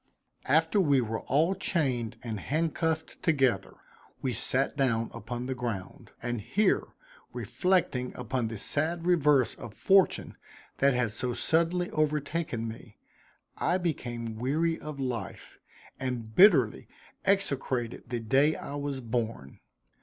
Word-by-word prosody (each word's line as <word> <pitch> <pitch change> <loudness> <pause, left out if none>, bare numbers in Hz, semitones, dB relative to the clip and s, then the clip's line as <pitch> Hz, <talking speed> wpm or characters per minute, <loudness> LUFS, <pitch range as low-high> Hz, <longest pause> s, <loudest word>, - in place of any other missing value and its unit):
After 160 +8 +3
we 145 -6 +4
were 110 -2 -2
all 160 +8 +2
chained 130 - -1
and 110 -4 -4
handcuffed 160 - -1
together, 130 - +1 0.4
we 130 -2 -2
sat 135 +4 +1
down 115 -5 +1
upon 120 +2 -5
the 130 - -2
ground; 115 -7 -5
and 120 -2 -2
here 185 - +1 0.5
reflecting 180 -9 0
upon 125 -1 -2
the 110 0 -5
sad 165 - -1
reverse 150 -7 +4
of 110 - -10
fortune 195 -1 +3 0.4
that 140 -1 +4
had 125 -4 +1
so 125 +3 -3
suddenly 170 +4 +1
overtaken 150 -5 -1
me, 110 -1 -10 0.6
I 175 - +1
became 120 -10 -3
weary 160 +6 0
of 150 -2 -7
life, 120 -7 -5 0.4
and 120 -4 -4
bitterly 200 - +5 0.4
execrated 135 - -1
the 120 -2 -2
day 135 +7 +3
I - - -7
was 140 -2 -3
born. 115 - -3
130 Hz, 125 wpm, -29 LUFS, 120-160 Hz, 0.6 s, bitterly